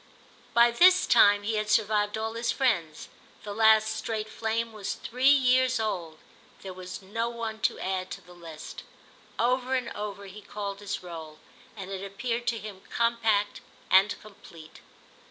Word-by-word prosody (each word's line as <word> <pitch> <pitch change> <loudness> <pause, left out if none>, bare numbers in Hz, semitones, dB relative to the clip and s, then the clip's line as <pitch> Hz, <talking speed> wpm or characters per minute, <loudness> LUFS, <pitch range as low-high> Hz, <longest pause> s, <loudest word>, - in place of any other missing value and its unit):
By 235 0 +6
this 365 +9 +6
time 205 -3 +5
he 220 +1 -1
had 215 0 -2
survived 210 -1 +2
all 220 0 -3
his 230 +1 -1
friends; 170 - -1 0.4
the 205 - -6
last 220 0 +4
straight 220 -1 -3
flame 225 +1 -2
was 210 -2 -4
three 255 +3 +1
years 255 -2 +4
old, 175 -8 -3 0.5
there 190 -1 -7
was 185 +1 -8
no 230 +5 -2
one 230 -2 -5
to - - +1
add 185 -1 -3
to - - -7
the 180 - -16
list. 165 -3 -10 0.6
Over 255 +2 +1
and 255 -2 -2
over 205 -1 -6
he 200 +2 -11
called 200 -1 -6
his 205 -2 -5
roll, 160 -3 -9 0.4
and 195 -1 -7
it 195 0 -5
appeared 235 +4 -3
to 235 -1 +1
him 205 -3 -9
compact 230 -3 +1 0.3
and 195 +2 +5
complete. 170 -6 -14
215 Hz, 160 wpm, -27 LUFS, 195-230 Hz, 0.6 s, By